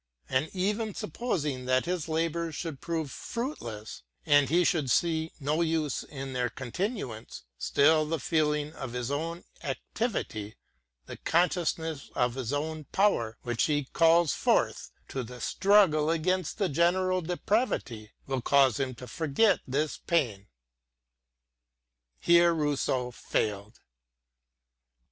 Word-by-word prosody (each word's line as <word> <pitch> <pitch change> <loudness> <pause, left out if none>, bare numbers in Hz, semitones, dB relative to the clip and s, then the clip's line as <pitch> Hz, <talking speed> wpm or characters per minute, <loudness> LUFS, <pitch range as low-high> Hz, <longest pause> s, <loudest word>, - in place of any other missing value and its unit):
And 135 +4 +1
even 205 +3 -1
supposing 150 - -3
his 160 +6 0
labours 165 0 -1
should 160 -3 -5
prove 160 -4 -3
fruitless, 120 - -5 0.2
and 145 -3 +5
he 175 +4 +4
should 155 -7 +1
see 160 +3 +1
no 150 +3 0
use 160 -3 0
hi 135 -2 -5
their 125 -2 -1
continuance, 130 - -5 0.2
still 155 +2 +3
the 165 0 -1
feeling 150 +1 0
of 135 -6 -7
his 125 +1 -3
own 165 +4 -3 0.2
activity, 135 - -3 0.5
the - - -8
consciousness 165 -3 0
of 125 -1 +1
his 130 -2 -4
own 155 +1 -3
power 125 - +1
which 120 -1 0
he 145 -3 0
calls 165 -2 +5
forth - - +1 0.2
to 135 - -3
the 125 +1 -9
struggle 185 - +4
against 175 +1 0
the 200 -3 +1
general 180 +4 +2
depravity, 175 - -1 0.2
will 135 -2 -2
cause 135 -1 +4
him 130 -2 -2
to 125 +2 -10
forget 160 - +2
this 145 +4 -1
pain. 115 - 0 1.7
Here 170 0 +5
Kousseau 135 -5 0
failed. 105 -1 -2
155 Hz, 120 wpm, -29 LUFS, 130-170 Hz, 1.7 s, and